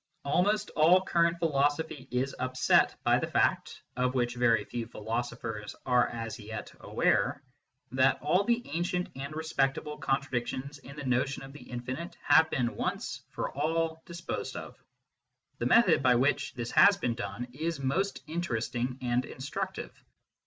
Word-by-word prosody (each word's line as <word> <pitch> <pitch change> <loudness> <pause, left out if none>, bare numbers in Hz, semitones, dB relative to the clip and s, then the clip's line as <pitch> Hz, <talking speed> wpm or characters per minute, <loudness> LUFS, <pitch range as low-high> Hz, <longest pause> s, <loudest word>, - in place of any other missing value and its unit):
Almost 205 +8 +1
all 170 +4 +5
current 170 -2 +2
philosophy 145 -2 0
is 130 +2 -1
upset 130 0 +3
by - - +4
the - - -2
fact - - +1
(of 125 +1 0
which 120 -1 +1
very 120 -2 +3
few 115 -2 -4
philo 115 +1 -2
sophers 115 -4 -6
are 125 -1 +4
as 115 0 -5
yet 110 0 -7
aware) 140 - +1 0.5
that 130 +1 +3
all 180 +7 +2
the 235 +3 0
ancient 175 +2 -1
and 140 +3 -6
respect 140 -4 0
able 150 0 -6
contradictions 135 +1 -2
in 140 +1 -12
the 145 -1 -7
notion 130 +2 0
of 135 0 -10
the 145 - -12
infinite 130 +7 -5
have 160 0 +6
been 120 -6 -1
once - - -3
for - - -4
all 160 +3 -1
disposed 170 0 -5
of. - - -7 0.8
The - - +1
method 235 +1 +5
by 125 -1 +5
which 135 +3 +1
this 120 -2 -4
has 200 0 +7
been 120 -11 0
done 115 +1 -5
is 160 +2 -3
most 180 +10 -1
interesting 125 -6 -2
and 120 0 +1
instructive. 185 +11 -5
135 Hz, 155 wpm, -30 LUFS, 120-160 Hz, 0.8 s, has